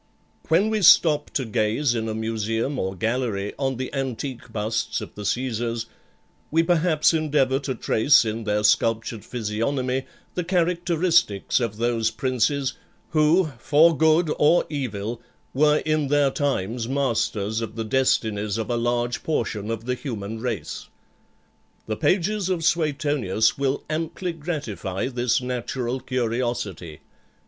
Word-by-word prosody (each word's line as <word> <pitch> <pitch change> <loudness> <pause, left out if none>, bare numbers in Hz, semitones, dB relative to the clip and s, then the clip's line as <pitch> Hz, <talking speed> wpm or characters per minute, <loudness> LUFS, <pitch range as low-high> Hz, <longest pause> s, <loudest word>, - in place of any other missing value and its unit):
When 190 +7 +3
we 215 -1 0
stop 155 -4 +6
to 135 - 0
gaze 110 +5 +1
in 110 -1 -2
a 110 - -3
museum 115 +4 -2
or 95 +1 -2
gallery 110 -1 -1
on 135 -2 -1
the 130 0 -5
antique 130 -2 -4
busts 110 +2 -2
of 105 - -8
the 105 - -8
Caesars, 115 0 -2 0.6
we 165 +2 +3
perhaps 165 -2 +3
endeavour 145 -4 +1
to 135 -2 -3
trace 120 +5 +4
in 110 +1 -3
their 105 0 0
sculptured 110 0 +1
physiognomy 125 +4 -2 0.3
the 180 - -2
characteristics 170 - +1
of 115 -4 -2
those 115 -1 +1
princes, 130 +2 0 0.4
who, 155 +1 +3
for 155 +6 +4
good 160 +1 +3
or 155 +4 +4
evil, 115 -5 -4 0.3
were 150 +2 +3
in 155 -2 +1
their 145 -1 +3
times 120 -5 -1
masters 115 -5 0
of 110 -1 -5
the 115 - -2
destinies 110 -4 +1
of 115 +2 -3
a 120 - +1
large 120 +1 -1
portion 110 -8 -2
of 115 0 -4
the 125 - 0
human 110 -5 -5
race. 115 -3 -4 1.0
The 110 - -2
pages 195 - +1
of 170 -3 -1
Suetonius 145 - +1
will 140 0 -1
amply 165 +3 -3
gratify 130 - -4
this 125 -1 0
natural 125 0 -3
curiosity. 120 - -3
125 Hz, 135 wpm, -24 LUFS, 110-150 Hz, 1.0 s, stop